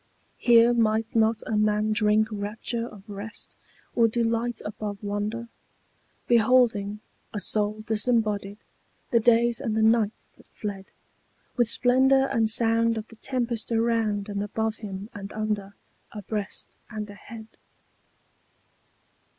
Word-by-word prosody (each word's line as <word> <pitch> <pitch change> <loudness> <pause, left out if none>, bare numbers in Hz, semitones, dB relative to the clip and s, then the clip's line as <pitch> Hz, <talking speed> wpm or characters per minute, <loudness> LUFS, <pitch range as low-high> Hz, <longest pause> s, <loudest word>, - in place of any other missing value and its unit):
Here 235 0 +6
might 225 -1 +1
not 225 0 +2
a 220 - -2
man 210 0 +2
drink 215 0 +3
rapture 215 +3 -4
of 205 -2 -14
rest, 205 +1 -7 0.4
or 230 -1 +4
delight 230 0 -1
above 210 -1 -5
wonder, 205 +3 -3 0.8
Beholding, 225 -4 +3 0.3
a - - -1
soul 210 +1 +1
disembodied, 210 -3 0 0.5
the 235 - +4
days 235 +1 +3
and 225 -5 -1
the 220 - +3
nights 220 -1 +2
that - - -21
fled, 200 -2 -6 0.7
With 240 -2 +2
splendour 265 +3 +4
and 230 -5 +1
sound 230 0 +3
of 215 0 -6
the 225 - -14
tempest 240 -4 -2
around 225 -3 +1
and 200 -1 -3
above 220 +2 -2
him 200 0 -7
and 200 -1 -8
under, 210 -2 -3 0.4
Abreast 210 0 -5
and 215 -2 -5
ahead? 220 +2 -11
220 Hz, 125 wpm, -26 LUFS, 210-230 Hz, 0.8 s, Here